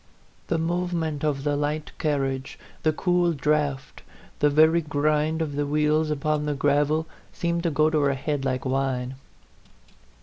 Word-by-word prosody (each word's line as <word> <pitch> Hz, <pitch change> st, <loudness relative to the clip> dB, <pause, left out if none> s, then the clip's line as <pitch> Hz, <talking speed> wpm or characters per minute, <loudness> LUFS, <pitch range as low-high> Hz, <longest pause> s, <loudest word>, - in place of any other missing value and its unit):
The 165 Hz, -, 0 dB
movement 165 Hz, -2 st, -1 dB
of 145 Hz, -3 st, 0 dB
the 145 Hz, 0 st, +1 dB
light 150 Hz, +1 st, -2 dB
carriage, 135 Hz, -3 st, -1 dB, 0.2 s
the 155 Hz, -, +3 dB
cool 175 Hz, +1 st, +1 dB
draught, 145 Hz, -2 st, -1 dB, 0.4 s
the 150 Hz, -, +4 dB
very 160 Hz, +3 st, +5 dB
grind 155 Hz, +1 st, 0 dB
of 145 Hz, -3 st, -5 dB
the 145 Hz, 0 st, -1 dB
wheels 150 Hz, +1 st, +2 dB
upon 150 Hz, 0 st, -1 dB
the 145 Hz, -, 0 dB
gravel, 145 Hz, +3 st, +2 dB, 0.3 s
seemed 170 Hz, 0 st, -1 dB
to 170 Hz, -, 0 dB
go 155 Hz, 0 st, +3 dB
to 155 Hz, -, +2 dB
her 140 Hz, -1 st, +2 dB
head 145 Hz, +1 st, -2 dB
like 130 Hz, -1 st, -1 dB
wine. 130 Hz, -1 st, -1 dB
150 Hz, 155 wpm, -25 LUFS, 140-160 Hz, 0.4 s, very